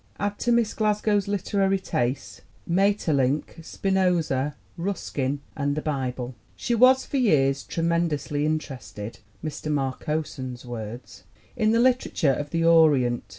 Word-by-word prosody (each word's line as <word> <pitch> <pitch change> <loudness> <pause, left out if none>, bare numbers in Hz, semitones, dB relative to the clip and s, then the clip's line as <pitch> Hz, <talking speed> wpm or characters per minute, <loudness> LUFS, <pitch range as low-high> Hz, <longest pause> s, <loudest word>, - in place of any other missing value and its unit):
Add 205 0 -2
to 240 - +1
Miss 235 -2 +2
Glasgow's 210 -2 +1
literary 195 0 +1
tastes 130 -8 -3 0.3
Maeterlinck, 165 -8 +1
Spinoza, 170 -8 0 0.2
Ruskin 145 -7 -2
and 145 -1 -1
the 155 - -2
Bible. 130 -4 -3 0.2
She 240 - -2
was 255 +3 +5
for 280 - -2
years 140 - +3
"tremendously 165 -3 -1
interested" 135 -8 -4 0.3
(Mr. 155 0 -4
Marcosson's 135 -2 -3
words) 120 0 -8 0.3
in 220 -3 +2
the 230 - +3
literature 240 - +2
of 145 +3 -4
the 165 +2 0
Orient. 150 -8 +4
155 Hz, 120 wpm, -25 LUFS, 135-200 Hz, 0.3 s, was